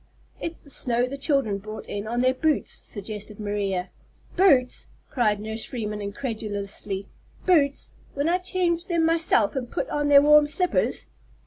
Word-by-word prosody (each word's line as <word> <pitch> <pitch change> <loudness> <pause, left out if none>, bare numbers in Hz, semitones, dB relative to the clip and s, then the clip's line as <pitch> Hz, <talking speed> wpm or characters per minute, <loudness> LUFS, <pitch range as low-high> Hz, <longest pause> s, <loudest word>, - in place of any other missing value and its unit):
"It's 330 0 -5
the 285 - -7
snow 245 -1 +3
the 260 +2 -5
children 275 -8 +1
brought 215 +2 -8
in 205 +1 -5
on 240 +2 -1
their 255 +1 +3
boots," 305 +2 0
suggested 210 0 -8
Maria. 200 -3 -2 0.4
"Boots!" 280 -10 +3 0.2
cried 215 -6 +1
Nurse 220 +1 -5
Freeman 210 -4 -4
incredulously. 205 -3 -4 0.4
"Boots! 295 -7 +2 0.2
when 285 +2 0
I 355 +2 +2
changed 360 -2 0
them 335 -2 +2
myself 325 -10 +2
and 250 -3 -3
put - - -3
on 295 0 0
their 285 -1 +7
warm 300 0 +6
slippers!" 360 +4 0
250 Hz, 150 wpm, -25 LUFS, 210-300 Hz, 0.4 s, their